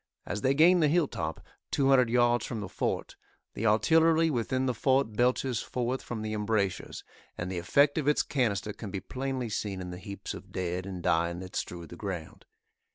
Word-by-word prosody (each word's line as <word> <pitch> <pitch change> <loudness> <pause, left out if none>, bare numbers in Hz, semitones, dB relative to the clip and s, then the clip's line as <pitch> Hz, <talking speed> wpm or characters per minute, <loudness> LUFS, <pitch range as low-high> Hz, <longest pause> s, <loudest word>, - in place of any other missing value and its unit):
As 105 - -3
they 135 +4 +2
gain 175 +4 +6
the 155 - +4
hill 160 0 +3
top, 80 -8 -5 0.2
two 135 -1 +2
hundred 130 -3 +5
yards 120 0 +3
from 115 - -4
the 105 - -4
fort, - - -3 0.4
the 110 - -1
artillery 160 +8 +4
within 130 +1 0
the 125 - +1
fort 130 -1 +2
belches 125 +1 +1
forth 125 +1 -2
from 110 -3 -5
the 110 0 -3
embrasures, 105 -3 -1 0.3
and 85 +1 -4
the 90 - -2
effect 140 - +3
of 145 - -3
its 150 - +3
canister 105 -6 -1
can 105 - -7
be 95 - -3
plainly 130 +5 -3
seen 105 -2 -3
in 90 -1 -6
the 90 - -7
heaps 100 +1 -6
of - - -11
dead 90 0 -3
and 90 -3 -6
dying 85 +1 +1
that 95 0 -9
strew 85 -1 -4
the 85 - -10
ground. 90 -4 -6
110 Hz, 200 wpm, -29 LUFS, 95-135 Hz, 0.4 s, gain